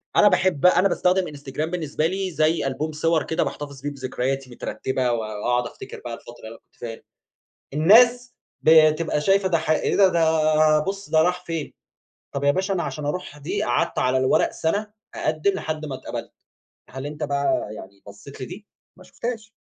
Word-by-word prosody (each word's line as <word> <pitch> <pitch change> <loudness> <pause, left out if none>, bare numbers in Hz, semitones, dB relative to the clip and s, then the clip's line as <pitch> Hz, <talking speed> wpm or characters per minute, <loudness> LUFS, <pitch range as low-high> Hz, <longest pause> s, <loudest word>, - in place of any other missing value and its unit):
أنا - - +6
باحب 180 -6 +2
بقى 180 0 +5
أنا 190 - +4
باستخدم 185 0 +1
Instagram 145 +2 -4
بالنسبة 160 -3 -2
لي 190 +1 -3
زي 155 -1 +1
ألبوم 145 +4 -3
صور 160 0 +1
كده 160 - 0
باحتفظ 140 -2 -6
فيه 145 - -3
بذكرياتي 135 0 -3
مترتبة، 130 +1 -2
و - - +1
وأقعد 110 +3 -1
أفتكر - - -10
بقى 120 - -4
الفترة 120 -1 -11
اللي 115 +1 -10
كنت - - -35
فيها 115 -1 -7 0.7
الناس 240 +10 +5 0.3
بتبقى 155 0 +5
شايفة 195 +4 +3
ده 170 -3 +2
ح 160 - -3
إيه 155 - +1
ده؟ 195 -1 +6
ده 155 -2 +3
بُص 195 +5 -5
ده 160 0 +5
راح 180 +1 0
فين، 165 -3 -4 0.6
طب 140 0 -3
يا 140 - +5
باشا 190 +6 0
أنا 175 - -1
عشان 150 - -5
أروح 150 -1 -4
دي 145 - -3
قعدت 120 - 0
على 130 +1 +2
الورق 130 0 +2
سنة 200 +7 -1 0.3
أقدِّم 155 +5 0
لحد 155 -4 -4
ما 140 - -5
اتقبلت. 130 - -7 0.6
هل 130 +2 -7
أنت 150 +1 -5
بقى 140 -6 0
يعني 100 -1 -12
بصيت 105 +8 -12
لدي؟ 180 +10 -8 0.3
ما 185 - -15
شُفتهاش. 225 +3 -6
155 Hz, 180 wpm, -23 LUFS, 135-180 Hz, 0.7 s, أنا